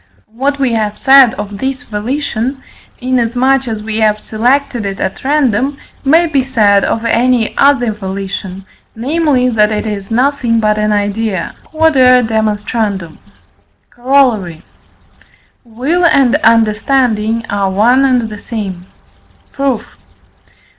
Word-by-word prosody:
What 275 +4 -1
we 265 -4 0
have 210 -2 -2
said 270 -3 +5
of 205 -1 -7
this 265 0 -3
volition 250 +3 -3 0.4
(inasmuch 255 +1 0
as 220 -2 -4
we 220 0 -3
have 215 -1 +2
selected 245 +3 -1
it 195 -1 -5
at 190 - -4
random) 275 -1 0 0.3
may 320 +5 +4
be 290 -5 +1
said 215 -6 +2
of 225 0 -2
any 235 0 +1
other 270 -5 +3
volition, 195 -1 -6 0.3
namely, 270 +1 0
that 215 -2 +2
it 215 +1 -2
is 205 -2 -5
nothing 245 -1 +1
but 215 -1 +1
an 210 0 0
idea. 205 -2 -2 0.2
Q.E.D. 225 - +1 0.8
Corollary. 240 - 0 1.0
Will 265 +10 -2
and 270 -6 +3
understanding 230 -1 +1
are 200 -1 -1
one 235 +8 +3
and 250 -4 +1
the 210 -1 -9
same. 190 -6 -6 0.6
Proof. 275 -4 -2
230 Hz, 120 wpm, -13 LUFS, 210-265 Hz, 1.0 s, said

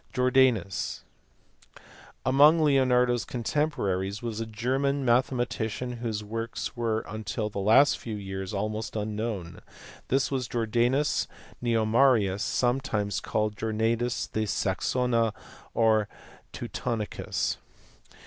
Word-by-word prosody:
Jordanus*. 125 -8 +2 1.2
Among 145 +5 +6
Leonardo 130 -5 +4
s 120 - -1
contemporaries 110 -7 -1
was 115 -2 -3
a 115 - -3
German 135 +5 -1
mathematician, 120 -1 0
whose 110 -3 -3
works 115 +2 -4
were 115 -2 0
until 110 0 -4
the 100 - -4
last 110 +8 +5
few 110 -2 -5
years 95 -2 -5
almost 110 +2 -3
unknown. 105 -4 -3 0.5
This 135 +2 +1
was 130 -3 -1
Jordanus 120 +5 +1 0.3
Nemorarius, 115 -3 +3
sometimes 120 -5 0
called 105 -1 -1
Jordanus 115 +3 0
de 110 0 -1
Saxonia 115 +4 +1 0.4
or 110 -2 +3 0.4
Teutonicus. 115 -4 -3
115 Hz, 100 wpm, -27 LUFS, 105-125 Hz, 1.2 s, Among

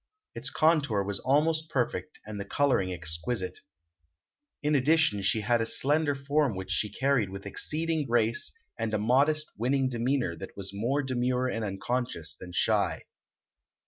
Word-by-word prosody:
Its - - -4
contour 145 -10 +2
was 100 0 -2
almost 155 +4 +1
perfect 135 +4 -2
and 105 -1 -6
the - - -2
coloring 115 -7 +1
exquisite. 90 +3 -3 1.0
In 150 +1 +2
addition 145 -6 +3
she 95 +3 +1
had 115 +2 +2
a - - +1
slender 145 +4 +2
form 140 -3 +1
which 95 0 -5
she 105 - 0
carried 130 -4 +1
with 100 +1 -8
exceeding 155 +7 -1
grace 115 -1 +2 0.3
and 110 -1 -1
a - - +2
modest, 140 +8 +2
winning 130 +3 +1
demeanor 120 -5 0
that 95 - -9
was 100 0 -4
more 125 +8 0
demure 125 -1 0
and 115 -3 -2
unconscious 100 -4 -3
than 90 +2 -10
shy. 95 -2 +1
120 Hz, 150 wpm, -29 LUFS, 100-140 Hz, 1.0 s, addition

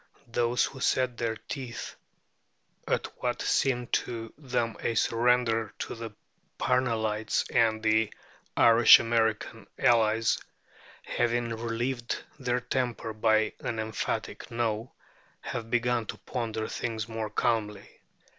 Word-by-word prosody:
Those 120 +1 +2
who 135 - -8
set 130 -1 +1
their 115 -1 -1
teeth 125 +1 -6 0.9
at - - +1 0.2
what - - -1
seemed 125 -3 +1
to 115 -2 -2
them 125 -5 -2
a 115 - -1
surrender 115 -1 +2
to - - -4
the 115 -1 -6 0.5
Parnellites 110 -4 +1
and 110 -1 +2
their 110 0 +3 0.5
Irish 115 0 +8
American 115 -2 0
allies, 115 -1 +3 0.6
having 120 0 0
relieved 120 +2 -2 0.2
their 125 -1 0
temper 125 -3 -2
by 110 0 +2
an 115 - -3
emphatic 110 -1 -3
No, 115 0 -2 0.5
have 115 -1 -5
begun 120 -1 +1
to - - -5
ponder 110 -3 -3
things 110 -2 -3
more 110 -1 -4
calmly. 105 -2 -1
115 Hz, 115 wpm, -28 LUFS, 110-120 Hz, 0.9 s, Irish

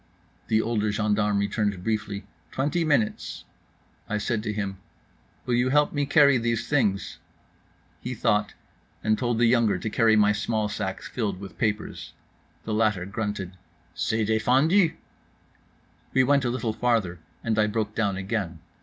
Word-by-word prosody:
The 110 -1 +2
older 110 -2 0
gendarme 105 -1 +1
returned 100 -2 -1
briefly, 105 -2 -2 0.3
"Twenty 150 +6 0
minutes." 140 -9 0 0.7
I 105 - 0
said 105 +1 -1
to 105 - -3
him: 100 -2 -4 0.7
"Will 125 - -1
you 125 +2 +2
help 145 +2 +3
me 145 -2 0
carry 140 -4 +5
these 115 -1 -1
things?" 105 -10 0 0.8
He - - -5
thought, 105 0 +1 0.5
and 110 0 +3
told 120 0 -1
the 120 - +4
younger 115 -4 +3
to 110 - -4
carry 110 0 +4
my 105 -1 +5
small 105 +1 -1
sack 100 -3 -4
filled 100 -6 -3
with 100 0 -10
papers. 105 -1 -2 0.5
The 110 - -3
latter 105 -4 +1
grunted, 105 -2 -4 0.4
"C'est 100 +6 0
défendu." 135 - +3 1.2
We 130 - +5
went 140 0 +3
a - - +1
little 120 -2 -2
farther, 110 -8 0 0.2
and 110 -2 0
I 105 - +4
broke 105 0 -2
down 100 -4 0
again. 95 -3 -3
110 Hz, 150 wpm, -26 LUFS, 105-120 Hz, 1.2 s, carry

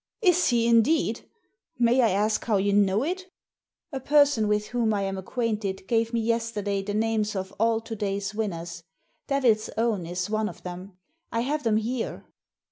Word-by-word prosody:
Is 360 -2 +4
he, 235 -2 +2
indeed? 235 +1 +2 0.5
May 245 +1 +4
I 230 - +4
ask 210 +3 +1
how 220 -4 +2
you 200 +1 +1
know 200 +2 +3
it? 365 +4 -3 0.3
" - - -40
''A 265 -1 -4
person 285 -7 +4
with 210 0 0
whom 230 -3 +1
I 200 - -1
am 195 0 -2
acquainted 205 -2 -3
g^ve 230 -1 +1
me 235 -1 0
yesterday 220 -3 -1
the 205 +1 -4
names 215 -1 0
of 190 0 -4
all 225 0 +2
to 225 0 -6
day's 200 0 -2
winners. 170 -6 -4 0.5
Devil's 245 -6 +2
Own 220 -7 0
is 180 +1 -3
one 215 0 -1
of - - -13
them. 180 +1 -8 0.3
I 230 - 0
have 295 +5 -1
them 225 -4 +2
here." 230 +2 -3
220 Hz, 180 wpm, -26 LUFS, 200-235 Hz, 0.5 s, Is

